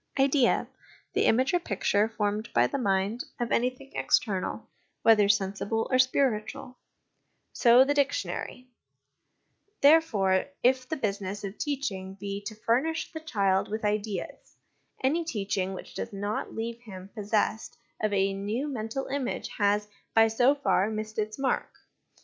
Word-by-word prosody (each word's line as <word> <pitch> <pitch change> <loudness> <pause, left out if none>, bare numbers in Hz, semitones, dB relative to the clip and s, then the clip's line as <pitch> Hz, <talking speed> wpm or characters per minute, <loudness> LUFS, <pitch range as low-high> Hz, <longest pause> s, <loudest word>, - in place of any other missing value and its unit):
' - - -8
Idea, 270 -2 +3 0.5
the - - +2
image 260 +8 +3
or 355 - +4
picture 205 - +1
formed 210 0 -2
by 120 0 +5
the 125 - -2
mind 200 +1 0 0.2
of 240 -1 -2
anything 255 +3 -1
external, 195 -5 0 0.4
whether 210 -3 +5
sensible 200 +2 0
or 255 - +3
spiritual/ 255 0 0 0.7
so, 245 +1 +6
the 285 +2 +1
dictionary; 285 - -2 1.1
therefore, 225 -12 +4 0.2
if 255 0 +2
the - - -1
business 200 -5 -3
of 200 +1 -6
teaching 200 -10 -3
be 200 0 -5
to 215 - -7
furnish 260 +10 0
the 320 - -6
child 200 -11 0
with 215 +1 -3
ideas, 210 -3 -3 0.5
any 310 +6 +2
teaching 195 - -2
which - - -10
does - - -5
not 205 +1 -4
leave 230 +1 -4
him 195 -4 -10
possessed 215 0 -1 0.2
of 215 - +1
a 195 -1 +2
new 210 +8 -2
mental 245 -1 -4
image 270 -2 -3
has, 205 0 +2 0.3
by 225 0 +7
so 245 +5 +3
far, 220 -8 +1
missed 215 0 -4
its 215 0 -2
mark. 270 -1 -1
220 Hz, 145 wpm, -28 LUFS, 200-260 Hz, 1.1 s, by